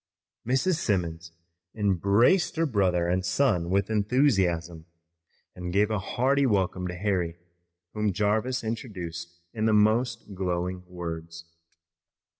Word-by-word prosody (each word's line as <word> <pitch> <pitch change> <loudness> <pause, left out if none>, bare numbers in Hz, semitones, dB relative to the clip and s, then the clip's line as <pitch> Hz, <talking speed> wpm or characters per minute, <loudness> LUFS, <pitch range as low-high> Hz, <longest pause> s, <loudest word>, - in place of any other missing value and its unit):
Mrs. 150 +8 +2
Simmons 85 - -2 0.4
embraced 105 - +3
her 165 +1 +1
brother 95 - +1
and 90 +1 0
son 90 -3 +1
with 100 +3 +1
enthusiasm, 95 - +1 0.7
and 90 -1 -5
gave 105 +3 +2
a 105 - 0
hearty 135 +7 +1
welcome 95 -4 0
to 90 - -5
Harry, 90 -3 -1 0.6
whom 105 -1 0
Jarvis 110 +6 0
introduced 85 -7 -6
in 110 -1 -1
the 110 - +3
most 110 +1 +2
glowing 90 -1 -2
words. 85 -2 -7
100 Hz, 115 wpm, -27 LUFS, 90-110 Hz, 0.7 s, embraced